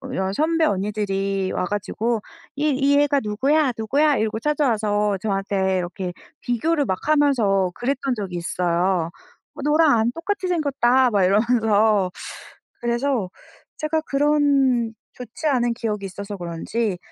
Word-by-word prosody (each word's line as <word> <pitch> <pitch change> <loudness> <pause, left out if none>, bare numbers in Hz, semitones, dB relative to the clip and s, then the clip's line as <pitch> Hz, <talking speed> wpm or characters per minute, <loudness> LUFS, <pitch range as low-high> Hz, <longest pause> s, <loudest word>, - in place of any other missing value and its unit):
여 190 -3 -1
선배 325 +5 +1
언니들이 195 -3 -1
와 - - -1
가지고 210 +3 -2 0.3
"이 300 +2 0
이 275 +1 +2
애가 285 -1 +2
누구야? 265 +6 +1
누구야?" 285 +7 +2
이러고 220 0 -1
찾아와서 215 -8 +1
저한테 195 -2 0
이렇게 180 +1 -4 0.3
비교를 285 +5 0
막 185 -3 -2
하면서 225 -11 +3
그랬던 265 0 -1
적이 190 -5 -5
있어요. 175 0 0 0.5
"너랑 305 +1 +4
안 230 +2 +1
똑같이 370 +4 -3
생겼다." 265 -6 +2
막 200 -2 +2
이러면서 215 -2 +2 0.7
그래서 240 -3 0 0.5
제가 310 +1 0
그런 275 -5 +2 0.2
좋지 250 +5 -6
않은 240 -4 +2
기억이 210 -4 -3
있어서 200 +2 -7
그런지 180 +4 -3
225 Hz, 290 characters per minute, -22 LUFS, 195-280 Hz, 0.7 s, 너랑